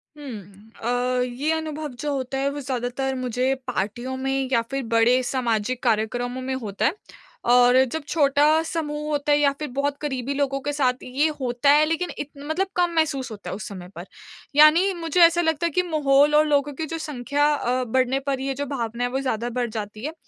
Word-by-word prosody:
हुँ। 215 -7 -10
अ, 245 +1 0
ये 250 +5 -2
अनुभव 310 -1 -4
जो 295 - -2
होता 270 -1 -3
है 275 +1 +1
वो 290 - -5
ज़्यादातर 260 0 -2
मुझे 255 +1 0
पार्टियों 240 +3 -3
में 270 0 -1
या 235 -3 +3
फिर 275 0 -2
बड़े 240 +3 +4
सामाजिक 245 -1 -1
कार्यक्रमों 245 +2 0
में 260 0 -3
होता 210 -6 -3
है। 305 - +2 0.5
और 245 +1 +6 0.2
जब 320 -1 -3
छोटा 285 -2 +3 0.2
समूह 300 -2 -3
होता 295 0 0
है 290 - +5
या 285 -1 +4
फिर 305 - -3
बहुत 280 +2 -1
क़रीबी 270 -2 -2
लोगों 275 -1 -1
के 290 - -2
साथ 260 -3 0
ये 270 +5 +1
होता 250 +1 +1
है 300 +1 +5
लेकिन 330 +3 -1
इत 290 - -4
मतलब 315 +7 -2
कम 355 -1 +2
महसूस 285 -5 0
होता 205 -2 -8
है - - -4
उस 210 - -7
समय 185 -3 -8
पर। - - -7 0.5
यानी 320 +6 +6
मुझे 340 0 0
ऐसा 340 +1 +6
लगता 320 -1 0
है - - +2
कि 360 - +2
माहौल 295 -3 +3
और 305 +1 +5
लोगों 290 -1 +1
की 315 +4 -4
जो 325 +2 -5
संख्या 290 -2 -1
अ, 255 -3 0
बढ़ने 255 +2 +1
पर 275 -1 -2
ये 270 +1 -2
जो 285 +2 -4
भावना 240 -4 -3
है 245 - 0
वो 265 +2 -2
ज़्यादा 240 -3 -2
बढ़ 240 0 -2
जाती 215 0 -6
है। 310 - -3
270 Hz, 205 wpm, -23 LUFS, 245-295 Hz, 0.5 s, और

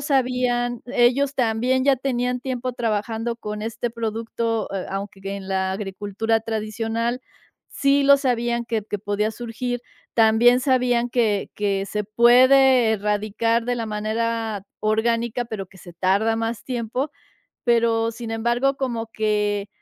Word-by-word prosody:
sabían, 250 -3 0
ellos 260 +3 +2
también 250 +2 +1
ya 275 -1 +4
tenían 250 -1 -1
tiempo 255 -1 -3
trabajando 225 0 -2
con 210 -2 -6
este 230 +2 -3
producto, 225 0 -2
eh, 195 -2 -3
aunque 195 0 -5
en 195 0 -5
la 190 0 0
agricultura 205 +3 -1
tradicional. 225 +2 -2 0.5
Sí 275 0 +2
lo 280 0 +7
sabían 240 -3 0
que 230 -2 -2
que 205 - -2
podía 205 +1 -1
surgir. 240 +1 -4 0.3
También 235 +2 +5
sabían 245 -2 +2
que 220 -5 +1
que 200 -1 0
se 210 +1 -3
puede 250 +2 +5
erradicar 215 +2 0
de 245 +1 0
la 230 -2 -3
manera 220 0 -2 0.2
orgánica, 230 +2 0
pero 215 -4 -6
que 190 +1 -18
se 175 -1 -12
tarda 200 +6 +1
más 225 0 -3
tiempo. 250 +3 -3 0.5
Pero 230 -1 +2
sin 230 0 -7
embargo, 240 +4 +1
como 235 -4 -3
que, 210 -1 0
230 Hz, 135 wpm, -23 LUFS, 215-245 Hz, 0.5 s, lo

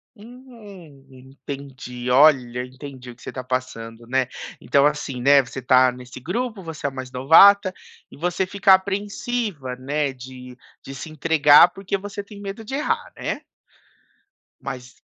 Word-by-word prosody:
Hum, 210 - -14
entendi, 130 -1 -9
olha 125 -3 +4
entendi 130 -1 -11
o - - -15
que 125 - -23
você - - -8
está 130 - -6
passando, 120 -3 -5
né, 130 +1 0 0.3
então 140 0 +2
assim, 145 -4 -2
né, 140 +2 +6
você 130 +1 -8
está 130 0 +4
nesse 125 0 -11
grupo. 215 - -4
Você 160 -3 -8
é - - +2
o - - -16
mais 130 -1 -7
novata 185 +9 +6 0.4
e - - -13
você 180 +3 -1
fica 195 0 +4
apreensiva, 200 - -2
né, 140 +2 -2
de 125 -1 -12 0.3
de 135 - -9
se 155 +4 -8
entregar 155 +1 +5
porque 195 +1 -4
você 205 +1 -7
tem 205 0 -13
medo 205 +3 -7
de 265 - -5
errar, 295 - -2
né? - - -4 1.2
Mas 125 -1 -8
140 Hz, 155 wpm, -22 LUFS, 130-195 Hz, 1.2 s, né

